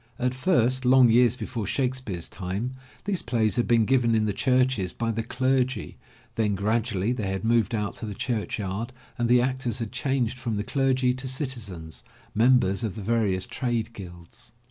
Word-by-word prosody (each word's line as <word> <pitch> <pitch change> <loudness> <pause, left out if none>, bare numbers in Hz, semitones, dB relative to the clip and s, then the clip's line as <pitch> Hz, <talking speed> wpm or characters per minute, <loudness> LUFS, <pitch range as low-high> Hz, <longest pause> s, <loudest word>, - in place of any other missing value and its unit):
At 125 0 0
first, 130 -4 +2
long 125 -1 +6
years 120 0 +5
before 115 -3 -4
Shakespeare's 130 -10 -2
time, 100 +7 -4 0.3
these 200 -3 0
plays 115 -3 +1
had 120 - +1
been 115 -2 +4
given 120 -2 +3
in 110 -1 +2
the 105 - 0
churches 125 -5 +1
by 115 -1 -1
the 115 +1 -2
clergy, 130 +2 0 0.4
then, 105 -3 0
gradually 110 +1 0
they 110 -6 -3
had 95 +1 -3
moved 115 -1 +2
out 105 -2 -3
to 110 - -5
the 105 - -5
church 115 -2 -2
yard 105 +5 -4 0.3
and 120 0 +1
the 125 0 +6
actors 130 -3 -1
had 115 -4 -4
changed 130 -3 -1
from 115 -5 -2
the 105 - -1
clergy 130 -1 +1
to 130 +1 -6
citizens, 115 - -5 0.3
members 115 -3 +3
of 105 -4 -2
the 105 - -6
various 100 -4 +1
trade 120 -3 -2
guilds. 90 -5 -11
115 Hz, 180 wpm, -26 LUFS, 105-130 Hz, 0.4 s, long